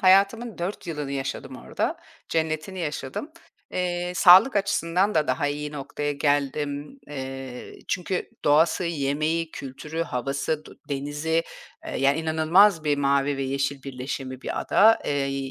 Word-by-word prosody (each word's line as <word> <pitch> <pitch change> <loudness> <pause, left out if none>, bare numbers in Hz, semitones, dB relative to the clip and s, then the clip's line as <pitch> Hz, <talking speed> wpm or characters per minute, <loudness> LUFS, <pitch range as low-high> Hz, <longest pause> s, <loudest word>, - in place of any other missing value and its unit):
hayatımın 200 +4 +4
4 175 +2 -4
yılını 150 -4 -4
yaşadım 135 -1 -4
orada, - - -2 0.3
cennetini 160 +3 -2
yaşadım. 155 - -4 0.4
Eee, 180 -1 -1
sağlık 190 +8 +7
açısından 195 0 +1
da 155 -1 +2
daha 130 +3 0
iyi 150 +1 -3
noktaya 145 +1 -3
geldim. 145 - -1
Eee, 135 -3 -7
çünkü 185 +3 -2
doğası, 160 +4 +4
yemeği, 155 +1 -1
kültürü, 150 +5 -5
havası, 140 +2 -2
du - - -14
denizi, 145 +4 -1 0.4
eee, - - -4
yani 140 +3 +3
inanılmaz 160 +3 +4
bir 145 -1 +2
mavi 140 0 +2
ve 135 - -2
yeşil 135 +1 -2
birleşimi 130 0 -5
bir - - -3
ada. 225 +2 +5
Eee, 135 -1 -1
150 Hz, 130 wpm, -25 LUFS, 140-170 Hz, 0.4 s, sağlık